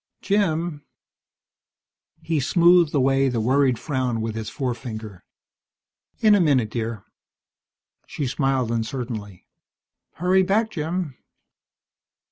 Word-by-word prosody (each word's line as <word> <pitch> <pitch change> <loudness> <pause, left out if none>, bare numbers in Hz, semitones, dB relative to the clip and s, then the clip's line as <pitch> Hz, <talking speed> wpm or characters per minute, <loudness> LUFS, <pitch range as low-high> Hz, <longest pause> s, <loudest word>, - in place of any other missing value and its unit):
"Jim 170 -6 0 0.7
" - - -48
He 160 -2 0
smoothed 170 +3 +4
away 135 0 +3
the 120 -2 -1
worried 130 +2 +2
frown 130 -5 -2
with 110 0 -3
his 110 -1 -5
forefinger. 115 -6 -5 1.0
"In 215 -2 +6
a 205 - +4
minute, 130 -9 +2
dear." 115 -3 -4 1.0
She 145 - -4
smiled 130 -2 0
uncertainly. 110 -4 -4 0.7
"Hurry 185 +3 +3
back, 215 +4 +1
Jim." 160 - -3
135 Hz, 100 wpm, -23 LUFS, 115-170 Hz, 1.0 s, In